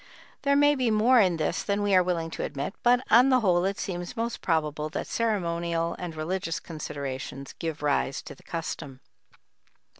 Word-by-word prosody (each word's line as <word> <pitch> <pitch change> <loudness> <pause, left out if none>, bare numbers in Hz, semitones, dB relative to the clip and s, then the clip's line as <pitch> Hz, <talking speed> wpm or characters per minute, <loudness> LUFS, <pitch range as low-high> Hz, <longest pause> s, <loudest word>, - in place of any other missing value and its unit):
There 280 0 +2
may 290 +1 +5
be 255 -4 +1
more 225 +4 +5
in 185 -5 +3
this 155 - -1
than 200 0 -1
we 205 -1 +1
are 185 - +7
willing 170 -2 -1
to - - -5
admit, 145 +5 -4
but 245 +1 +3
on 245 +4 +7
the 255 -1 +4
whole 180 -4 +3
it 195 0 -1
seems 175 0 -5
most 230 +1 -2
probable 155 -2 0
that - - -4
ceremonial 170 -6 -1
and 175 -3 -5
religious 165 +1 -2
considerations 140 -4 -6
gave 160 -3 -4
rise 140 -2 0
to - - -9
the - - -19
custom. 145 -5 -6
175 Hz, 180 wpm, -27 LUFS, 155-215 Hz, -, are